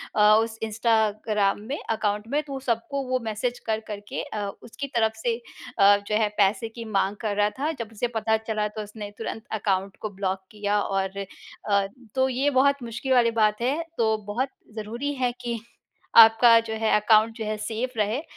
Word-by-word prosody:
अ, 210 - +3 0.2
उस 225 0 -2
इंस्टाग्राम 215 -2 +1
में 285 - -2
अकाउंट 210 -1 -1
में 295 - +2
तो 275 -2 -6
सबको 260 +3 -2
वो 255 - +1
मैसेज 225 +3 -2
कर-कर 215 -1 -2
के - - -3
अ, 205 -1 -4 0.2
उसकी 280 +4 -6
तरफ़ 220 -1 +2
से 230 +1 0 0.4
अ, 200 0 +7
जो 210 - 0
है 215 -1 +3
पैसे 210 +3 +2
की 230 +1 -8
माँग 200 -1 0
कर 215 -3 -1
रहा 205 0 +3
था। 300 +3 0
जब 230 -2 -4
उसे 225 +2 -2
पता 220 0 +2
चला 220 -1 -2
तो 215 +1 -6
उसने 210 0 -8
तुरंत 225 -1 -5 0.2
अकाउंट 195 -1 -1
को 215 - -3
ब्लॉक 190 -1 -2
किया 210 -1 0
और 195 0 -2 0.5
अ, 200 -1 +3 0.3
तो 260 0 +3
ये 265 +3 +1
बहुत 280 -1 +3
मुश्किल 240 +3 -2
वाली 235 -2 +4
बात 215 0 +3
है। 275 +7 +1 0.2
तो 220 -2 +2
बहुत 245 +6 -1 0.3
ज़रूरी 235 +7 -3
है 245 -1 +2
कि 235 -2 -3 0.6
आपका 230 +1 +9
जो - - -2
है - - +3
अकाउंट 220 +1 +4
जो 225 - -4
है 215 0 -2
सेफ 225 +4 -3
रहे 215 +6 0
220 Hz, 190 wpm, -25 LUFS, 210-240 Hz, 0.6 s, आपका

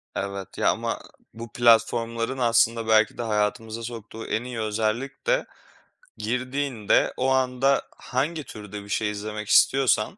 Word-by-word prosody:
Evet. 100 -1 -5
Ya, - - +3
ama - - -1 0.3
bu 115 -1 -9
platformların 115 +1 +2
aslında 115 -1 +2
belki 110 -2 +4
de - - -3
hayatımıza 110 +1 -1
soktuğu 115 -1 -7
en 110 - -1
iyi 125 -2 -6
özellik 110 +5 -2
de - - +2 0.7
girdiğinde 125 +1 0
o 130 +1 +1
anda 130 +1 +2 0.2
hangi 150 +5 -2
türde 105 -4 -9
bir 100 - -14
şey 105 +1 0
izlemek 105 0 -5
istiyorsan 125 - +4
115 Hz, 135 wpm, -25 LUFS, 105-125 Hz, 0.7 s, belki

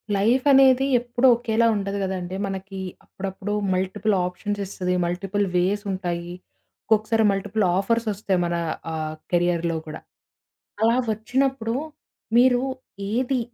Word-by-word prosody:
Life 235 +7 +2
అనేది 265 -1 +6
ఎప్పుడు 245 +2 +1
ఒకేలా 235 -1 +1
ఉండదు 200 0 -2
గదండీ! 185 -1 -3
మనకి 195 0 -6 0.3
అప్పుడప్పుడు 195 +1 -5 0.2
మల్టిపుల్ 190 +3 0
ఆప్షన్స్ 205 +3 -4
ఇస్తది, 180 -1 -2
మల్టిపుల్ 195 +4 -1
వేసుంటాయి, 180 -2 -1 0.6
ఒక్కొక్కసారి 220 +1 +2
మల్టిపుల్ 205 +2 -1
ఆఫర్సొస్తాయి 210 -2 0
మన 170 0 -1 0.4
ఆహ్, 155 -1 -3 0.2
కెరియర్‌లో 170 -1 +1
కూడా. 155 - -7 0.8
అలా 230 +2 +4 0.2
వచ్చినప్పుడు 245 +1 -1 0.6
మీరు 245 0 +5 0.5
ఏది 255 +2 +1
205 Hz, 105 wpm, -24 LUFS, 185-230 Hz, 0.8 s, అనేది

